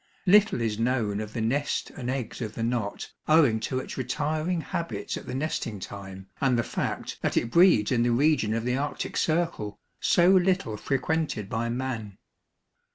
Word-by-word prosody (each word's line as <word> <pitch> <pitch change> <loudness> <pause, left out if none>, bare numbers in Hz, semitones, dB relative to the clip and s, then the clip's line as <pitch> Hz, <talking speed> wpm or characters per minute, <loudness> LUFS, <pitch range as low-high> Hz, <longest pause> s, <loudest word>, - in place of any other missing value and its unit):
Little 205 - +5
is 110 -2 -1
known 115 -4 0
of 105 0 -7
the 115 - -2
nest 140 +6 -1
and 125 -3 -6
eggs 130 -2 -3
of 110 -2 -4
the 115 - -3
Knot 115 -3 -2 0.2
owing 150 -8 +5
to 120 +4 -2
its 130 - -5
retiring 155 +7 -1
habits 170 +1 -4
at - - -8
the - - -4
nesting 130 -7 -2
time 95 0 -8
and 130 -3 +3
the 120 - +1
fact - - -3
that - - 0
it 115 - 0
breeds 170 - +5
in 120 -2 +3
the 120 - +2
region 120 -4 +2
of 115 0 -2
the 125 0 +1
Arctic 145 +2 -3
Circle, 155 -11 -1 0.2
so 175 +1 +4
little 185 - +2
frequented 135 -3 -1
by 115 +1 -1
man. 115 -5 -4
125 Hz, 175 wpm, -27 LUFS, 110-155 Hz, 0.2 s, Little